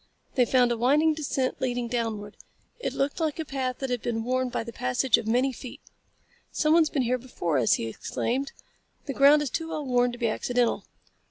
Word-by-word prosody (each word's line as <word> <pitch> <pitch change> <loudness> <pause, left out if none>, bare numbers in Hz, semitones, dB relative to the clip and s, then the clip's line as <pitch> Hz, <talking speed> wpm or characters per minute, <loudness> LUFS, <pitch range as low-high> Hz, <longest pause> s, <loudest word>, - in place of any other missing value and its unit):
They 250 - +3
found 245 -1 +3
a 235 - 0
winding 295 +7 +3
descent 275 -4 -2
leading 245 -2 -1
downward. 225 -4 -3 0.4
It - - -2
looked 275 +4 -1
like 315 -2 -1
a 320 - -3
path 260 -3 -3
that 270 -2 -4
had 245 -2 -1
been 225 -1 -2
worn 255 +1 0
by - - -2
the 230 0 -9
passage 125 - +2
of 220 - -7
many 255 +4 +2
feet. 250 0 -9 0.7
"Someone's 315 0 +3
been 275 - 0
here 250 +1 0
before 175 - -2
us," 115 - +3
he - - 0
exclaimed. 255 - -3 0.5
"The 275 - -3
ground 285 +3 +6
is 275 - -4
too 325 +3 -3
well 310 -2 -4
worn 245 -1 +2
to 240 - -8
be 235 -1 0
accidental." 245 +2 0
255 Hz, 200 wpm, -27 LUFS, 235-275 Hz, 0.7 s, ground